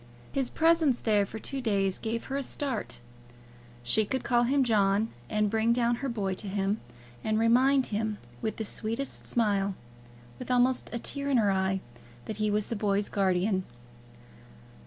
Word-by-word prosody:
His 270 -2 -1
presence 325 -5 +3
there 205 -3 +2
for 220 - -7
two 270 +5 -4
days 195 -5 0
gave 225 +1 -3
her 270 - -4
a 280 - 0
start. 260 - -3 0.9
She 120 - +2
could 260 +5 -2
call 240 -1 +3
him 275 +2 +3
John, 210 -2 +2 0.2
and 210 0 +1
bring 225 +2 +2
down 240 0 +2
her 275 +2 -3
boy 200 -5 -1
to 200 - -4
him, 200 +2 -1 0.4
and 215 0 +1
remind 255 +4 +4
him, 215 0 -1 0.2
with 220 - -2
the 220 - -2
sweetest 230 +6 -2
smile, 200 -4 +1 0.6
with - - -7
almost 250 +1 +2
a 235 - -2
tear 280 +4 -2
in 270 - +3
her 210 -4 +3
eye, 190 0 0 0.4
that 215 - -5
he 215 0 +1
was 210 0 +1
the 230 - -4
boy's 205 -1 0
guardian. 190 0 +1
220 Hz, 170 wpm, -29 LUFS, 200-250 Hz, 0.9 s, remind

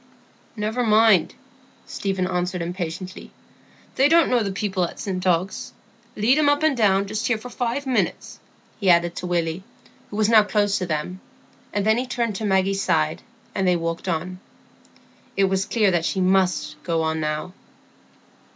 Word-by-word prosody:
"Never 220 +3 -1
mind," 215 -5 +4 0.5
Stephen 195 -2 -2
answered 180 -1 -2
impatiently; 180 +1 -6 0.6
"they 275 +2 +3
don't 330 -3 +4
know 245 -2 +3
the 200 -2 -2
people 190 -2 -1
at 170 - -4
St 185 -2 -3
Ogg's. 180 +2 -1 0.4
Lead 240 +8 +3
him 295 -2 +4
up 290 +1 +1
and 315 -3 +3
down 200 -4 +3
just 215 +3 -3
here 240 - +1
for 245 +3 -10
five 250 +3 -2
minutes," 260 -2 -2 0.4
he 195 -3 +1
added 170 0 +3
to 180 - -4
Willy, 170 0 -1 0.5
who - - -8
was 215 0 +2
now 220 -1 +7
close 205 0 +1
to 185 - -3
them; 165 +3 -3 0.5
and 205 -1 -1
then 220 +2 +3
he 255 - -3
turned 235 -4 -2
to 220 - -4
Maggie's 195 0 +1
side, 155 -4 0 0.3
and 190 - 0
they 180 - +4
walked 165 +1 -3
on. 180 +2 -3 1.0
It 195 - +3
was 190 0 +1
clear 215 -4 +2
that 170 -2 0
she 190 - -1
must 185 -5 +1
go 165 -1 -1
on 160 0 -1
now. 155 +3 -3
190 Hz, 170 wpm, -23 LUFS, 175-220 Hz, 1.0 s, now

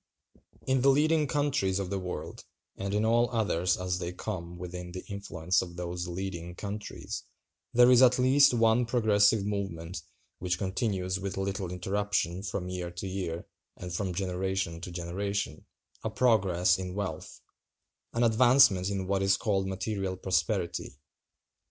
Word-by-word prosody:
In 130 -1 +2
the 135 - +5
leading 150 +2 +3
countries 135 -10 +1
of 100 -2 -3
the 100 - -1
world, 90 -4 -6 0.3
and 100 0 -4
in 105 +2 +1
all 120 +1 +3
others 100 -6 +1
as 90 0 -2
they 85 -1 -3
come 90 -1 -6
within 90 0 -7
the 90 - -7
influence 100 -3 -1
of 85 -1 -7
those 90 0 -4
leading 90 -1 -5
countries, 105 +2 -6 0.5
there 125 0 +6
is 125 0 +7
at 125 -1 +6
least 135 +2 +5
one 115 0 +3
progressive 110 -3 +3
movement 95 -4 -4 0.4
which 90 -1 -1
continues 95 -1 -1
with 95 0 -4
little 95 -1 -2
interruption 95 -1 -1
from 95 -2 -4
year 90 -1 -4
to 85 +2 -6
year 90 -3 -4 0.3
and 90 -1 -7
from 95 +1 -2
generation 95 -2 -2
to 90 - -6
generation—a 90 +2 -5
progress 95 -7 +3
in 90 0 -5
wealth; 100 -1 -5 0.7
an 115 - +1
advancement 115 -5 +5
in 95 -2 -2
what 95 +1 0
is 95 0 +3
called 95 -3 0
material 95 0 -2
prosperity. 95 -1 -1
95 Hz, 145 wpm, -29 LUFS, 90-110 Hz, 0.7 s, is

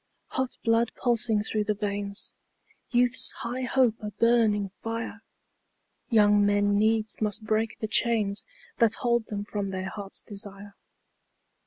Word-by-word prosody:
Hot 260 -1 -2
blood 230 0 +2
pulsing 230 -3 +1
through 215 0 0
the 210 0 -1
veins, 200 -1 -3 0.6
Youth's 245 0 +3
high 245 +2 -3
hope 250 -3 +3
a 210 - -4
burning 215 -3 +2
fire, 225 +2 -5 0.9
Young 210 -3 +5
men 205 0 +3
needs 220 +1 +1
must 215 +1 -1
break 220 +1 0
the 220 - -3
chains 215 -3 +1 0.4
That 230 -3 +4
hold 235 -2 0
them 205 -1 -4
from 205 -1 -3
their 190 0 -3
hearts' 200 -2 -6
desire. 200 -1 -7
215 Hz, 135 wpm, -27 LUFS, 205-230 Hz, 0.9 s, Young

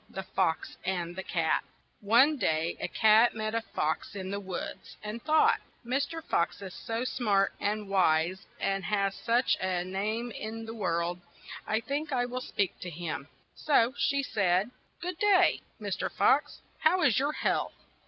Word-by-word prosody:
THE 190 - -6
FOX 185 -4 -1
AND 175 -2 -2
THE 190 - -4
CAT 165 -3 0 0.4
ONE 245 +9 +5
day 160 -6 0
a - - -2
cat 220 +2 +5
met 215 0 -2
a 230 - +1
fox 160 -3 -2
in 190 -1 -5
the 200 - -2
woods, 190 -3 -6
and 215 +2 -5
thought: 310 +4 +4
' - - -35
' - - -35
Mr. 280 +6 -1
Fox 170 - 0
is 190 -2 -7
so 230 +1 -3
smart 210 -6 +1
and 210 0 -1
wise 185 -1 +2
and 195 0 0
has 200 0 +1
such 240 +4 +2
a 185 -2 0
name 215 +6 -2
in 225 +1 -6
the 225 - -6
world, 175 -4 -1 0.5
I 220 +1 +1
think 290 +5 -3
I 245 -2 +1
will 250 +1 -4
speak 200 -7 -2
to 180 - -6
him. 160 -4 -5
' - - -36
' - - -41
So 255 -4 +4
she 280 -1 +1
said: 200 -2 +1 0.3
"Good 360 0 -4
day, 395 -3 +4 0.2
Mr. - - -3
Fox, - - +2 0.2
how 350 +3 +3
is 255 -7 +4
your 285 +3 0
health? - - -1
210 Hz, 180 wpm, -29 LUFS, 185-245 Hz, 0.5 s, ONE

